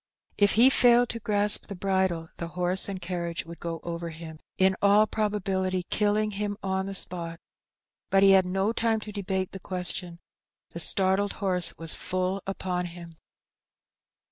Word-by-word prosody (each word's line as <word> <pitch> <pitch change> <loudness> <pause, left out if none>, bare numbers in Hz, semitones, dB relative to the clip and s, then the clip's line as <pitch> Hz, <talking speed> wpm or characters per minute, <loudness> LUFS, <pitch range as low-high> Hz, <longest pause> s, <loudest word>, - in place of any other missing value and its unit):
If 205 -1 +5
he 245 +4 +6
failed 245 -1 +5
to 230 - -4
grasp 205 -1 0
the 200 - -6
bridle 190 -3 -1
the 170 - -4
horse 180 +2 +2
and 195 -1 -4
carriage 170 -2 -4
would 170 0 -10
go 165 -1 -4
over 170 0 -5
him, 160 -1 -10 0.2
in 190 0 +3
all 205 +1 +5
probability 190 -4 -1
killing 210 +1 +1
him 205 0 -3
on 190 0 -1
the 195 - -4
spot; 170 -3 -2 0.7
but 195 0 +4
he 195 - +7
had 190 -1 +5
no 195 +4 0
time 225 -1 +1
to 210 - -8
debate 190 -2 -3
the 195 - -7
question, 180 -1 -2 0.5
the 170 - -7
startled 190 +3 +2
horse 185 -4 +1
was 165 -1 -4
full 185 +1 -2
upon 180 -2 -2
him. 170 -1 -10
190 Hz, 165 wpm, -27 LUFS, 175-205 Hz, 0.7 s, he